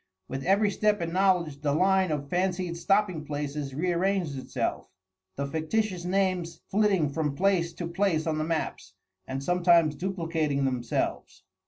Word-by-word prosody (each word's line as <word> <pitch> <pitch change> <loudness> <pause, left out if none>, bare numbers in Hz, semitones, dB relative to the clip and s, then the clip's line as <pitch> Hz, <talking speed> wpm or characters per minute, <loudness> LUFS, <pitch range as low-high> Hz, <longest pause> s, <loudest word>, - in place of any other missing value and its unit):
With 135 0 -5
every 200 +2 +3
step 210 +1 +1
in 170 -1 -3
knowledge 180 -6 +2
the 145 -2 +1
line 190 +1 +3
of 145 -2 -2
fancied 180 +1 -1
stopping 185 -1 +1
places 145 -2 -4
rearranged 175 -1 0
itself, 130 - -3 0.5
the 140 - -2
fictitious 175 +5 -1
names 185 -2 0
flitting 195 -7 +2
from 150 -3 -1
place 180 -1 +2
to 170 - -5
place 170 -2 0
on 155 -1 -1
the - - 0
maps, 155 - -3 0.3
and 135 +1 -4
sometimes 170 -1 +4
duplicating 160 -4 -1
themselves. 125 -3 -2
170 Hz, 145 wpm, -27 LUFS, 150-190 Hz, 0.5 s, sometimes